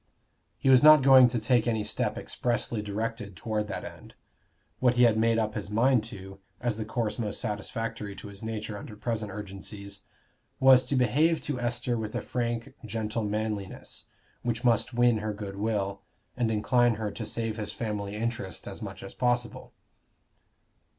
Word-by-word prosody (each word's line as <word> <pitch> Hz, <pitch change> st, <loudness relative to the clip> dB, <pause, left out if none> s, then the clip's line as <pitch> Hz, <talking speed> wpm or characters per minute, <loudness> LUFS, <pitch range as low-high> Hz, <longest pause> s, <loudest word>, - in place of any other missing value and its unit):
He -, -, -3 dB
was 130 Hz, -1 st, +7 dB
not 155 Hz, -2 st, +8 dB
going 130 Hz, -2 st, +8 dB
to 120 Hz, 0 st, -1 dB
take 120 Hz, +1 st, +2 dB
any 110 Hz, -2 st, +1 dB
step 105 Hz, -, -1 dB
expressly 120 Hz, -2 st, -1 dB
directed 105 Hz, 0 st, -4 dB
toward 105 Hz, +3 st, -2 dB
that -, -, -4 dB
end: -, -, -10 dB, 0.6 s
what 125 Hz, -1 st, +3 dB
he 125 Hz, -, +5 dB
had 115 Hz, -2 st, +5 dB
made 115 Hz, +1 st, +3 dB
up 110 Hz, -1 st, 0 dB
his 105 Hz, -2 st, -4 dB
mind 120 Hz, +2 st, +3 dB
to, 95 Hz, -3 st, -9 dB, 0.2 s
as 120 Hz, -3 st, -1 dB
the 110 Hz, -, -3 dB
course 110 Hz, 0 st, -2 dB
most 105 Hz, -3 st, -2 dB
satisfactory 105 Hz, 0 st, -4 dB
to -, -, -9 dB
his 100 Hz, -1 st, -9 dB
nature 110 Hz, -1 st, -4 dB
under 105 Hz, -, -9 dB
present 110 Hz, -1 st, -3 dB
urgencies, 100 Hz, 0 st, -7 dB, 0.6 s
was 130 Hz, -1 st, +7 dB
to 135 Hz, -, -1 dB
behave 150 Hz, +6 st, +3 dB
to 145 Hz, -4 st, -3 dB
Esther 120 Hz, 0 st, -1 dB
with 110 Hz, -1 st, -5 dB
a -, -, -1 dB
frank 120 Hz, -1 st, -3 dB
gentle 110 Hz, 0 st, -3 dB
manliness, 105 Hz, -2 st, -3 dB, 0.4 s
which 120 Hz, 0 st, -2 dB
must 115 Hz, -2 st, +3 dB
win 120 Hz, -2 st, +4 dB
her 105 Hz, 0 st, -3 dB
good 100 Hz, -1 st, -7 dB
will, 100 Hz, -2 st, -1 dB, 0.3 s
and 120 Hz, -3 st, +1 dB
incline 120 Hz, +2 st, +3 dB
her 105 Hz, -1 st, -3 dB
to -, -, -6 dB
save 115 Hz, -1 st, -2 dB
his 105 Hz, -1 st, -4 dB
family 105 Hz, -3 st, -4 dB
interest 110 Hz, -5 st, -4 dB
as -, -, -7 dB
much -, -, -7 dB
as -, -, -8 dB
possible. 120 Hz, -2 st, -1 dB
110 Hz, 170 wpm, -28 LUFS, 105-120 Hz, 0.6 s, not